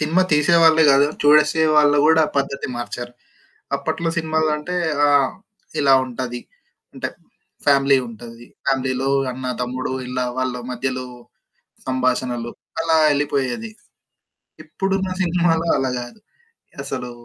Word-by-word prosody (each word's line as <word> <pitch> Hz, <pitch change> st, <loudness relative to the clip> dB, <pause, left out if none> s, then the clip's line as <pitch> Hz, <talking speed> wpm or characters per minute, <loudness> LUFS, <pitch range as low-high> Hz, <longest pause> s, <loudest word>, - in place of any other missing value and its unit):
Cinema 160 Hz, +5 st, +2 dB
తీసేవాళ్ళే 160 Hz, +1 st, +5 dB
కాదు. 140 Hz, +1 st, +5 dB, 0.2 s
చూడసే 150 Hz, +2 st, +4 dB
వాళ్ళు 145 Hz, -1 st, +5 dB
కూడా 160 Hz, 0 st, +5 dB
పద్ధతి 140 Hz, 0 st, -1 dB
మార్చారు. 120 Hz, 0 st, -6 dB, 0.6 s
అప్పట్లో 160 Hz, +4 st, -3 dB
సినిమాలంటే 155 Hz, +1 st, -1 dB, 0.3 s
ఆహ్, 145 Hz, -2 st, +3 dB, 0.5 s
ఇలా 135 Hz, -2 st, +5 dB
ఉంటది. 120 Hz, -1 st, -5 dB, 0.5 s
అంటే -, -, -4 dB, 0.6 s
ఫ్యామిలీ 140 Hz, -1 st, +4 dB
ఉంటది. 115 Hz, +1 st, -11 dB, 0.2 s
ఫ్యామిలీలో 130 Hz, -1 st, 0 dB, 0.2 s
అన్న, 130 Hz, +1 st, -7 dB, 0.2 s
తమ్ముడు 130 Hz, +1 st, -3 dB, 0.2 s
ఇలా 125 Hz, 0 st, -2 dB
వాళ్ళ 130 Hz, -1 st, -1 dB, 0.2 s
మధ్యలో 130 Hz, +1 st, -3 dB, 0.8 s
సంభాషణలు 125 Hz, -2 st, -1 dB, 0.3 s
అలా 165 Hz, 0 st, +2 dB
యెళ్లిపోయేది. 145 Hz, -, -1 dB, 0.9 s
ఇప్పుడున్న 195 Hz, -1 st, -2 dB
సినిమాలో 170 Hz, -2 st, +1 dB
అలా 130 Hz, -, -1 dB
కాదు. 120 Hz, -, -11 dB, 0.7 s
అసలు 125 Hz, -, -5 dB
140 Hz, 105 wpm, -20 LUFS, 130-160 Hz, 0.9 s, తీసేవాళ్ళే